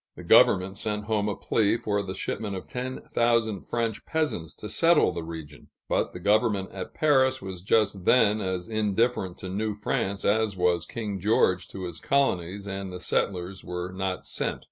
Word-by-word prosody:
The - - -10
governor 95 +1 +5
sent 105 +1 -3
home 105 -1 0
a 100 - -2
plea 110 0 +1
for 105 -3 -1
the 95 -1 -5
shipment 105 -3 -3
of 95 - -6
ten 125 +1 -5
thousand 115 -4 +1
French 115 -3 -2
peasants 150 - -2
to 105 - -8
settle 165 - +4
the 85 -1 -4
region; 80 -3 -9 0.2
but - - 0
the - - -8
government 105 0 +2
at 95 -1 -7
Paris 130 -4 +3
was 95 -5 -7
just 100 -1 +1
then 110 -4 +4
as 95 -2 -3
indifferent 110 -3 0
to 95 - -7
New 105 +2 -2
France 100 -1 -2
as 105 -1 +2
was 90 -1 +1
King 105 -4 -4
George 95 -2 +2
to 95 - -8
his 85 -3 -5
colonies, 100 - 0
and 95 -1 -5
the 90 - -6
settlers 95 +1 -1
were 90 +1 -4
not 95 0 -3
sent. - - -2
100 Hz, 180 wpm, -27 LUFS, 95-110 Hz, 0.2 s, governor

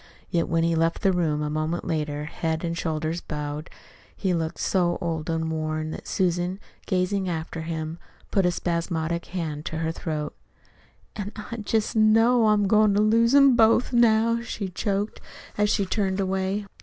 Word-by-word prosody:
Yet 170 -2 +1
when 165 0 +2
he 170 0 +2
left 165 +1 0
the 195 - +4
room 155 -4 0
a 150 - -2
moment 155 +3 -2
later, 150 -2 -2
head 160 +1 -3
and 170 -1 -2
shoulders 160 0 -2
bowed, 150 0 -5 0.5
he 190 -3 0
looked 165 -1 -2
so 175 -2 +1
old 165 -3 -3
and 160 0 -1
worn 155 0 -2
that - - -8
Susan, 180 +1 0 0.3
gazing 185 0 0
after 165 -1 -4
him, 160 0 -4 0.3
put 195 - +3
a 180 - +3
spasmodic 170 -1 -2
hand 160 -5 -4
to 160 - -3
her 160 0 -1
throat. 155 -2 -4 0.8
"An' 205 -1 -4
I 220 +2 -7
jest 215 0 -1
know 225 +2 +5
I'm 210 -1 +3
goin' 215 0 +4
to 205 - +4
lose 230 +4 +4
'em 275 -3 +7
both 230 +2 +4
now," 230 0 +4
she 210 -4 -4
choked 200 +3 -2 0.3
as 210 0 +2
she 200 -1 +1
turned 190 -1 -1
away. 190 +1 -1
175 Hz, 170 wpm, -25 LUFS, 160-210 Hz, 0.8 s, em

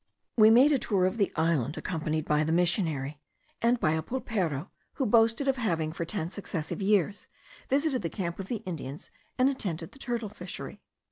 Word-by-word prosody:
We 215 -2 +7
made 255 +6 +7
the 280 - +3
tour 195 -6 +1
of 185 +4 0
the 200 -3 +2
island, 160 -3 +1
accompanied 155 -2 -2
by 150 0 +2
the 155 - -1
missionary 160 -5 0 0.4
and 235 +1 +3
by 155 - +2
a 160 0 +1
pulpero, 185 - -2 0.2
who 270 - -1
boasted 230 +4 +3
of 270 -1 +2
having, 165 -9 -1
for 170 - -3
ten 170 -2 -3
successive 185 -3 -4
years, 200 0 +1 0.4
visited 275 -2 +1
the 165 - -2
camp 170 -1 -4
of 190 - -5
the 225 -1 -4
Indians, 150 -5 -6 0.3
and 255 - +4
attended 180 - -3
the 275 - -16
turtle 235 -5 -3
fishery. 210 - -8
185 Hz, 185 wpm, -29 LUFS, 160-230 Hz, 0.4 s, We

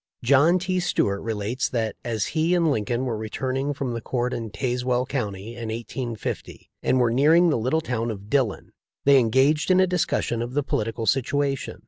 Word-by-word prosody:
John 140 +8 +5
T. 185 0 -1
Stuart 100 - 0
relates* 115 +3 -2
that, 110 -3 -2
as 115 -3 -1
he 165 +3 +2
and 170 -3 +2
Lin 110 -6 -1
coln 120 +4 -1
were 120 -3 -1
returning 130 +5 -2
from 135 -3 -3
the 115 - -4
court 125 +1 -2
in 115 -1 -4
Tazewell 125 +1 -1
county 105 -7 -3
in 120 -1 -6
1850, 115 0 -5
and 130 - +2
were 120 -2 +3
nearing 160 +7 +5
the - - +1
little 130 +8 +1
town 120 -5 -2
of 100 -2 -6
Dillon, 125 -4 0 0.3
they 140 -1 +7
engaged 130 +7 +2
in 185 0 +5
a 185 - +6
discussion 175 -9 -1
of 120 +2 -5
the 145 - +1
polit 110 -3 -2
ical 115 -2 -4
situation. 135 +1 0
125 Hz, 190 wpm, -24 LUFS, 115-145 Hz, 0.3 s, they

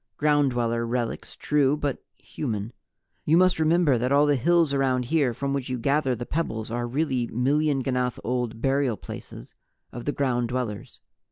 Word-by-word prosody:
Ground 145 -2 +3
Dweller 115 -1 -1
relics, 120 0 -3
true, 145 -1 +1
but 145 -3 -3
human. 110 -5 -5 0.5
You 160 +2 +3
must 185 -2 +4
remember 160 -5 +3
that 125 +3 -1
all 145 +1 +5
the 145 -1 +3
hills 165 +3 +2
around 130 -2 +1
here 145 -2 +2
from 140 +4 -3
which 135 -2 -3
you 130 - -2
gather 140 +1 +1
the 120 +1 -6
pebbles 110 -9 -3
are 120 0 -2
really 130 -2 -1
million 140 +3 +1
ganath 125 -2 -1
old 120 -2 -2
burial 135 -4 +1
places - - -10 0.4
of 120 0 -8
the 145 - +1
Ground 125 -4 0
Dwellers. 120 -5 -4
130 Hz, 170 wpm, -25 LUFS, 120-145 Hz, 0.5 s, all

